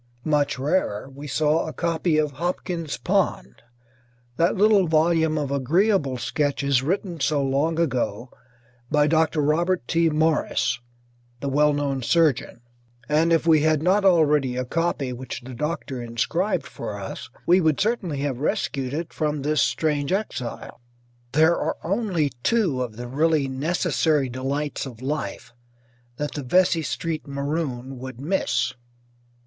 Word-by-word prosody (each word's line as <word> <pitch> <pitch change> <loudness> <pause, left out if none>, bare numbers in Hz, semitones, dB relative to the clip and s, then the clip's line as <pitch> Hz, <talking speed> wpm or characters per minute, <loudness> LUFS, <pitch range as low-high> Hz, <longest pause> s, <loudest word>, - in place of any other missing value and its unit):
Much 150 -2 +1
rarer, 135 - -1
we 145 +2 -8
saw 155 +3 +1
a 160 - -5
copy 165 -1 0
of 150 -1 +1
"Hopkins's 170 +1 -3
Pond," 60 0 -1 0.7
that 170 +6 +2
little 205 -2 +4
volume 160 0 +2
of 145 -2 -2
agreeable 145 - +2
sketches 140 0 0
written 175 +3 -2
so 145 0 +1
long 140 +5 0
ago 125 -6 -1 0.6
by 150 -1 +3
Dr. 160 0 +2
Robert 165 0 +1
T. 165 0 +2
Morris, 155 -5 +1 0.6
the 140 - -3
well 150 +2 +3
known 140 -2 -1
surgeon, 145 -4 +1 0.5
and 155 +3 +2
if 165 0 +3
we 160 -2 +5
had 155 -1 +2
not 195 +4 +3
already 150 -8 +3
a 125 - -1
copy 150 -3 -1
which 125 0 -6
the 130 +1 -9
doctor 140 -1 -3
inscribed 120 - -1
for - - -6
us - - -7 0.2
we 180 +2 +5
would 155 -4 +2
certainly 190 - -1
have 140 -4 -2
rescued 135 -2 -1
it 165 +1 -4
from 150 -2 -1
this 150 +1 +2
strange 150 -2 0
exile. 185 - -4 0.5
There 160 +3 +5
are - - -2
only 180 -6 0
two 185 - +1
of 120 -4 -4
the 120 0 -6
really 150 +2 +1
necessary 150 0 0
delights 140 +3 -3
of 125 -1 -11
life 130 -5 -4 0.6
that 150 0 -3
the 145 - -5
Vesey 170 +5 +3
Street 155 0 -3
maroon 140 -3 -3
would 130 -1 -8
miss. 140 -5 0
150 Hz, 145 wpm, -24 LUFS, 135-165 Hz, 0.7 s, we